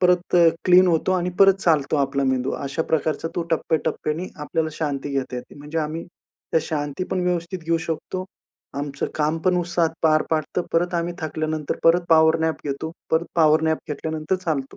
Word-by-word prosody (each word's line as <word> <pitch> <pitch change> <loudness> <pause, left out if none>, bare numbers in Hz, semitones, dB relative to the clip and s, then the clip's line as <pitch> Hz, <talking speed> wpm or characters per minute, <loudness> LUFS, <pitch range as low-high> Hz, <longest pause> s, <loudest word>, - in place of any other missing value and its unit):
परत 180 0 +3 0.3
क्लीन 185 0 +6
होतो 170 +2 +2
आणि 180 -1 0
परत 195 -1 +7
चालतो 155 -3 +2
आपला 140 0 0
मेंदू. 130 0 0
अशा 140 +4 -2
प्रकारचा 160 +1 -1
तो 170 - -1
टप्प्याटप्प्याने 160 +1 -1
आपल्याला 155 +1 -2
शांती 145 -2 -3
घेता 130 -2 -2
येते, 125 - -9
म्हणजे 150 +3 -5
आम्ही, 160 +2 -3
त्या 165 -2 -5
शांती 145 +3 -3
पण 185 - 0
व्यवस्थित 175 +1 -1
घेऊ 165 +1 +2
शकतो. 185 +3 -3 0.5
आमचं 140 -1 -3
काम 155 +1 0
पण 185 -1 +3
उत्साहात 170 -1 +1
पार 155 -1 +4
पाडतो. 160 +3 0
परत 175 +2 +1
आम्ही 170 0 -1
थकल्यानंतर, 155 -1 -3
परत 165 +2 +6
पॉवर 160 0 +5
नॅप 160 0 -1
घेतो. 145 +3 -3 0.2
परत 160 +2 +2
पॉवर 155 -1 +4
नॅप 160 - +1
घेतल्यानंतर 155 +4 -2
चालतो. 140 -5 -2
160 Hz, 170 wpm, -23 LUFS, 150-170 Hz, 0.5 s, परत